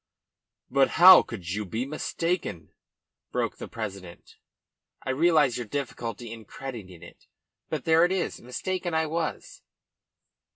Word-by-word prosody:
"But 135 +1 +4
how 185 +1 +10
could 95 -7 -8
you 105 +2 -2
be 110 +6 -3
mistaken?" 155 - -3 0.6
broke - - -1
from - - -7
the - - -24
president. 100 -6 -8 0.7
"I 130 - -1
realise 150 -3 +3
your 120 -3 -5
difficulty 120 -3 -5
in 115 -1 -11
crediting, 100 -10 -9
it. - - -15 0.4
But - - -4
there 160 +1 +5
it 175 - +3
is. 190 -2 -2
Mistaken 175 +7 -3
I 160 0 +2
was." 160 0 -4
130 Hz, 135 wpm, -27 LUFS, 110-165 Hz, 0.7 s, how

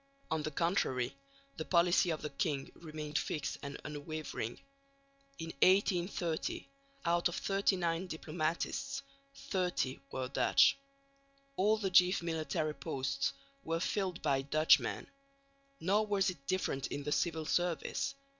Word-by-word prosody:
On 160 -1 +1
the 155 - -2
contrary, 140 -6 0 0.4
the 160 - -2
policy 175 +1 +4
of 160 -2 -2
the 150 - -3
king 140 -1 -1
remained 155 -2 -4
fixed 150 -1 -3
and 140 -1 -6
unwavering. 150 -5 -5 0.8
In 165 -1 -5
1830 180 -3 +2 0.4
out 170 +1 +3
of 175 - -4
39 185 -3 +1
diplomatists 170 - -2 0.3
30 180 -8 -1
were 130 -1 -2
Dutch. 135 - +5 0.8
All 215 +1 +3
the 195 -3 -1
chief 180 0 +5
military 160 -2 -1
posts 135 -8 -1 0.3
were 165 0 -1
filled 185 0 -1
by 140 -3 +2
Dutchmen. 155 +3 +3 0.7
Nor 205 +5 +2
was 195 -2 +2
it 140 -6 -15
different 140 -7 0
in 145 - -4
the 150 - -3
civil 160 0 0
service. 175 - 0
165 Hz, 125 wpm, -34 LUFS, 150-180 Hz, 0.8 s, Dutch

